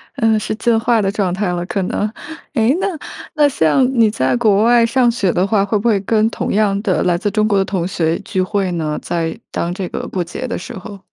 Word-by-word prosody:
呃， 225 -4 +2
是 210 - -3
进 235 0 +1
化 230 0 +2
的 195 -1 0
状 200 -3 -1
态 195 +2 -1
了， 175 0 -3
可 195 +2 -2
能。 205 +3 -1 0.4
诶， 240 +1 +2
那 390 - 0 0.5
那 300 -1 +5
像 255 - +2
你 225 -2 +5
在 130 - 0
国 215 -4 +3
外 235 0 +5
上 240 +1 +3
学 215 -6 0
的 180 +2 +1
话， 200 -1 +2
会 205 +2 0
不 210 +4 -1
会 215 -4 +3
跟 215 +2 +2
同 - - -3
样 200 -1 +2
的 200 -4 0
来 175 -1 +2
自 205 +3 -1
中 215 +1 +1
国 205 -2 +2
的 195 - +3
同 185 -3 -2
学 165 -3 0
聚 195 -2 -2
会 190 0 -1
呢？ 155 -3 -2
在 165 -2 -2
当 170 +1 -2
这 185 -1 -4
个 - - -5
过 185 - -2
节 175 +9 -6
的 - - -3
时 - - -8
候。 195 +2 -9
205 Hz, 260 characters per minute, -17 LUFS, 185-225 Hz, 0.5 s, 那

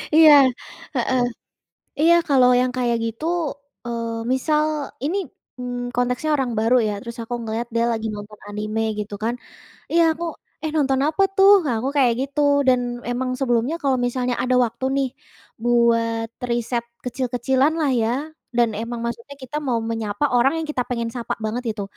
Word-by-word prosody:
Iya, 315 -1 +9 0.6
heeh, 260 -1 +1 0.8
iya 330 +3 +6
kalau 260 -4 +5
yang 255 0 +2
kayak 240 -2 +1
gitu 230 +6 -5 0.6
eee, 230 -1 -3
misal 300 +3 +1 0.4
ini, 340 +7 0 0.4
mmm, 245 0 -4
konteksnya 250 +4 0
orang 260 -3 -1
baru 225 +3 +4
ya, 210 - -1
terus 235 +1 -8
aku 230 - -6
ngelihat 225 +1 -3
dia 235 0 +2
lagi 225 -1 -2
nonton 210 0 -9
anime 215 +1 -3 0.2
gitu 210 0 -4
kan. 230 +2 0 0.6
Iya 335 +1 +5
aku, 345 - -4 0.4
"Eh 315 - 0
nonton 270 -3 +2
apa 315 +5 +1
tuh?" 390 +1 +7
Nah, 260 -5 0
aku 260 - -1
kayak 255 -4 +4
gitu 275 +2 -2 0.3
dan 255 -1 +5 0.3
emang 255 +1 -1
sebelumnya 245 +3 +1
kalau 270 -2 +2
misalnya 245 0 -1
ada 255 0 +2
waktu 235 +2 -5
nih, 275 -1 +1 0.5
buat 230 -1 +2 0.2
riset 235 0 -1 0.2
kecil 250 +1 -2
kecilan 265 +4 +2
lah 295 -3 +2
ya 230 -2 +1 0.5
dan 240 -1 +4
emang 230 +3 -4
maksudnya 235 +4 -5
kita 260 +2 -7
mau 250 -5 0
menyapa 220 +1 -2
orang 270 +6 +3
yang 325 - -3
kita 260 -4 0
pengen 235 -2 -2
sapa 240 -1 -3
banget 230 +4 -2
itu. 205 - -3
245 Hz, 165 wpm, -22 LUFS, 230-270 Hz, 0.8 s, Iya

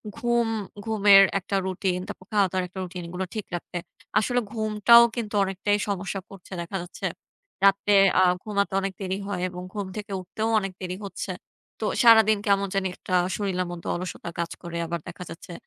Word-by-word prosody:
ঘুম 240 0 +1 0.4
ঘুমের 205 -3 +7 0.2
একটা 195 +1 -4
রুটিন, 185 -1 -1
তারপর 185 - -9
খাওয়া-দাওয়ার 190 -3 +2
একটা 180 +2 -9
রুটিনগুলো 180 0 -5
ঠিক 215 - -3
রাখতে। 175 +1 -6 0.4
আসলে 245 +3 +1
ঘুমটাও 220 +1 +6
কিন্তু 225 -4 -4
অনেকটাই 195 +2 0
সমস্যা 195 0 -2
করছে 195 -1 -14
দেখা 170 +3 -4
যাচ্ছে 175 0 -7 0.6
রাতে 200 +1 +4 0.3
আ - - +6 0.2
ঘুমাতে 200 -2 -1
অনেক 195 0 -2
দেরি 190 0 -2
হয় 195 -3 -3
এবং 180 0 -7
ঘুম 205 -2 -3
থেকে 210 0 -6
উঠতেও 215 +5 -3
অনেক 195 -2 -4
দেরি 180 -1 -3
হচ্ছে। 195 - -5 0.5
তো - - -2 0.2
সারাদিন 220 -2 +7
কেমন 200 0 +3
জানি 195 -1 +1
একটা 185 - -7 0.2
শরীরের 185 -3 -1
মধ্যে 175 -1 -7
অলসতা 180 -1 -5
কাজ 170 -1 -2
করে 170 -1 -6
আবার 170 +1 -3
দেখা - - -7
যাচ্ছে 170 +1 -10
195 Hz, 170 wpm, -25 LUFS, 180-210 Hz, 0.6 s, ঘুমের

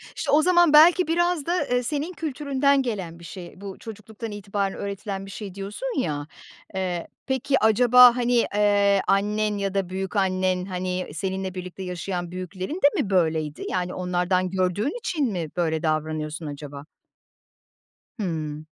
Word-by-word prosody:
İşte, - - -2
o 295 - +6
zaman 345 -2 +4
belki 335 +3 +7
biraz 345 -2 +1
da, 345 -2 0
eee, 250 0 +1
senin 295 +7 -3
kültüründen 280 -3 +1
gelen 190 -9 -4
bir - - -14
şey. 180 +2 -10
Bu, 195 -1 -7
çocukluktan 220 0 -8
itibaren 200 -1 -3
öğretilen 200 -1 -5
bir 195 - -10
şey, 200 -3 -7
diyorsun 210 - -4
ya. 145 - -2 0.5
Eee, 180 -3 -2 0.2
peki, 265 +1 +1
acaba, 245 +2 +7
hani, 245 -1 +2
eee, 200 -1 +3
annen 210 +1 +1
ya 195 -1 -2
da 195 -2 -1
büyükannen, 185 -1 0
hani, 185 -1 -3
seninle 190 +2 -3
birlikte 185 +1 -7
yaşayan 180 -1 -4
büyüklerin 185 - -5
de 285 - +4
mi 200 - -4
böyleydi? 160 -5 0
Yani, 180 0 -2
onlardan 180 0 0
gördüğün 190 - -1
için 300 - -1
mi 170 -4 -3
böyle 160 -2 0
davranıyorsun 155 0 -2
acaba? 145 -1 -8 1.3
Hımm. 155 -5 -3
195 Hz, 145 wpm, -24 LUFS, 180-245 Hz, 1.3 s, belki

